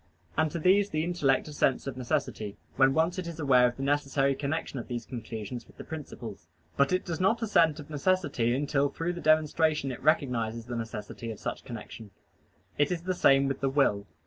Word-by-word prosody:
And 160 0 +2
to 160 - -4
these 195 +5 +4
the 155 -4 -1
intellect 160 -7 +1
assents 145 -3 +1
of 135 -2 -4
necessity, 110 -4 -2 0.2
when 135 0 +4
once 165 +4 +1
it 180 - -4
is 165 -1 -7
aware 130 -4 +5
of 120 - -5
the 135 - -4
necessary 140 -1 +1
connection 140 0 -3
of 120 - -7
these 120 -2 -4
conclusions 115 -1 -6
with - - -20
the - - -8
principles; 120 - -8 0.3
but 140 0 +3
it 185 0 +1
does 170 -2 -3
not 225 +5 +2
assent 165 -8 +3
of 145 - -9
necessity 145 -6 +1
until 145 0 +1
through 165 +4 -3
the 175 - -7
demonstration 155 -2 +2
it 125 - -7
recognizes 120 -7 +1
the 120 0 -5
necessity 115 0 -6
of 110 - -6
such - - -4
connection. 115 -2 -8 0.7
It 145 +2 +3
is 170 -2 -2
the 185 +1 0
same 135 -5 +4
with 135 - -2
the 135 - +1
will. 120 -8 +2
140 Hz, 200 wpm, -29 LUFS, 120-160 Hz, 0.7 s, aware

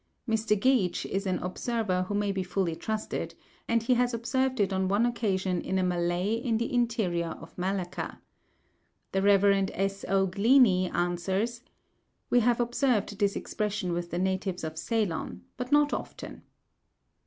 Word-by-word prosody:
Mr. 220 -2 +1
Geach 235 -6 +2
is 195 +1 -2
an 185 -1 +1
observer 185 -1 -1
who 205 - -2
may 205 -1 +1
be 195 -1 -2
fully 180 -2 -1
trusted, 215 +5 -4 0.3
and 230 -1 +2
he 250 - +3
has 245 0 +1
observed 260 +2 0
it 195 -1 +2
on 190 0 +1
one 205 +5 +2
occasion 195 -6 0
in 190 - -2
a 185 - +2
Malay 175 +2 0
in 230 0 0
the 235 +2 -2
interior 215 -9 0
of - - -13
Malacca. 185 -1 -3 0.9
The 195 - +1
Rev. 200 0 +5 0.3
S. 195 +1 -2
O. 195 0 +3
Glenie 200 -1 +4
answers, 190 +7 -1 0.7
"We 245 - +6
have 240 +1 +2
observed 240 -4 0
this 200 -1 +2
expression 210 -4 -2
with 175 0 -3
the 175 - -3
natives 190 0 -1
of 160 0 -4
Ceylon, 205 -2 -2
but 250 0 -5
not 295 0 +4
often." - - -6
200 Hz, 155 wpm, -28 LUFS, 185-230 Hz, 0.9 s, We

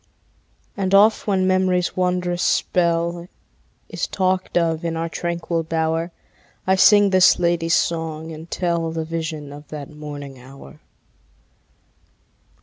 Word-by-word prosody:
And 195 -1 +1
oft 215 +3 +4
when 190 -2 +1
memory's 185 -1 +1
wondrous 180 -1 -1
spell 170 0 0 0.6
Is - - -3
talked 185 -1 -1
of 165 -1 0
in 165 -1 -2
our 165 +1 -2
tranquil 170 0 -3
bower, 165 +1 -1 0.5
I 190 - +3
sing 205 +1 +5
this 185 -1 +5
lady's 170 -1 +1
song, 160 -1 -2
and 160 +1 -10
tell 170 -2 -1
The 160 0 -4
vision 160 -3 -5
of 145 0 -12
that 150 -2 -8
morning 145 -3 -9
hour. 130 - -14
170 Hz, 125 wpm, -21 LUFS, 160-180 Hz, 0.6 s, sing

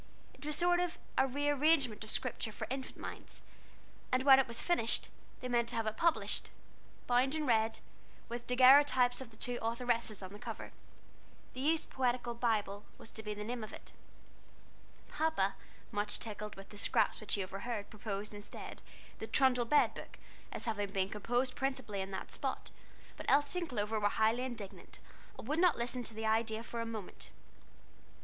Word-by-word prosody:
It - - -15
was 300 - +1
a - - -2
sort 350 0 +4
of 355 -1 -1 0.3
rearrangement 285 -3 +2
of 215 - -8
Scripture 230 -2 -2
for 220 - -5
infant 265 0 -4
minds; - - -8 0.7
and 255 0 +3
when 270 -1 +9
it 270 - +3
was 235 -1 -5
finished, 290 -11 +1 0.3
they 250 - -3
meant 240 -1 +1
to - - -4
have 225 - 0
it 215 0 -1
published, 335 +4 +1 0.6
bound 255 +4 +3
in 310 -1 -1
red, 225 -3 +3 0.5
with 240 0 -5
daguerreotypes 255 0 +6
of 260 - -7
the 220 - -18
two 245 +1 -1
authoresses 230 -2 0
on 185 +1 -7
the 205 - -9
cover. - - -6 0.8
"The 255 - -7
Youth's 315 +3 +3
Poetical 245 -2 0
Bible" 215 -4 0
was 225 - -10
to 220 - -6
be 210 -1 -4
the 210 - -5
name 235 +1 -3
of 215 - -7
it. - - -11 1.2
Papa, 300 -11 +1 0.4
much 205 -1 -1
tickled 210 -1 -6
with 195 0 -11
the 205 - -9
scraps - - +2
which 215 - 0
he 200 - -1
overheard, 200 +3 -4
proposed, 210 -1 -4
instead, 205 0 -8 0.4
"The 220 - -4
Trundle 250 -2 +3
Bed 295 +5 +4
Book," - - -9 0.3
as - - -4
having 205 -3 -1
been 195 -1 0
composed 245 +5 0
principally 260 -7 -1
in 190 - -4
that 190 - -5
spot, - - -3 0.5
but - - -8
Elsie 290 +5 +3
and 345 - -4
Clover 220 -3 0
were 205 0 +3
highly 220 +3 +2
indignant, 235 -6 -6 0.4
and - - -8
would 305 +4 +1
not 355 -2 +5
listen 245 +1 -1
to 225 - -5
the 220 0 -3
idea 220 0 +1
for 235 0 -4
a 230 - -3
moment. 220 -4 -6
235 Hz, 180 wpm, -34 LUFS, 215-265 Hz, 1.2 s, when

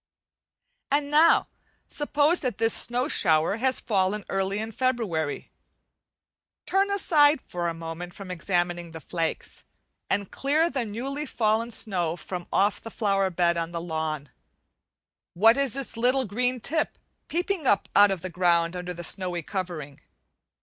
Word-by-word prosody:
And 285 +1 0
now, 315 +3 +5 0.4
suppose 295 +3 +2
that 250 -7 -2
this 225 0 +3
snow 245 +3 +2
shower 160 - +3
has 260 +2 +1
fallen 200 -1 0
early 195 +1 -1
in 220 +1 -4
February; 215 - -1 1.1
turn 390 +1 +2
aside 310 -7 +4
for 175 -1 -3
a 165 - -4
moment 165 +2 -7
from 195 -2 -8
examining 175 -1 -2
the 160 - -7
flakes, 165 +1 -4 0.5
and 200 -1 -1
clear 310 +5 +1
the 260 -4 -1
newly 270 +8 -4
fallen 225 -1 +1
snow 180 -7 -1
from 180 0 -6
off 200 +1 +2
the 225 - -8
flower 195 -3 +1
bed 170 -1 +1
on 165 0 -3
the 170 - -2
lawn. 160 -4 -3 1.1
What 225 +6 +6
is 275 -3 +1
this 275 -3 -1
little 255 +3 +2
green 250 +4 -1
tip 310 +4 -1 0.3
peeping 350 -2 -2
up 205 - +3
out 205 0 +7
of 190 -3 -2
the 185 - -4
ground 170 -1 +2
under 180 0 -5
the 175 - -7
snowy 175 0 -2
covering? 165 -7 -5
200 Hz, 150 wpm, -26 LUFS, 175-260 Hz, 1.1 s, out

